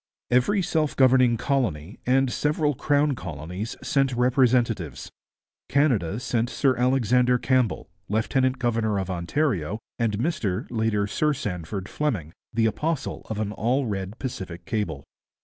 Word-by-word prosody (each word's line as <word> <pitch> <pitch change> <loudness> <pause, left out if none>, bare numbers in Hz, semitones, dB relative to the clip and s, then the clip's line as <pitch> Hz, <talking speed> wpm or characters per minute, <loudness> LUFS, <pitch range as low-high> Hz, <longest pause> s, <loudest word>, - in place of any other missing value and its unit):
Every 140 +11 +3
self 155 -3 0
governing 130 -3 +5
colony 110 - -1
and 130 0 +3
several 150 0 +1
crown 145 +2 +2
colonies 90 - -6
sent 135 -3 +1
representatives. 120 - +1 0.6
Canada 115 - +2
sent 120 -1 -1
Sir 135 -1 +2
Alexander 125 0 +3
Campbell, 130 -3 +1 0.2
lieutenant 130 +5 +1
governor 115 -4 0
of 95 -1 -2
Ontario, 95 - -1 0.2
and 110 -3 +1
Mr, 115 - -1
later 110 -3 +1
Sir 150 +9 +1
Sandford, 95 - -4
Fleming, 105 - -2 0.2
the 115 -1 +1
apostle 150 +6 -2
of 110 -1 -3
an 105 -1 -1
All 125 +6 0
Red 100 -1 -4
Pacific 95 -10 -6
cable. 85 -11 -2
120 Hz, 130 wpm, -25 LUFS, 100-135 Hz, 0.6 s, governing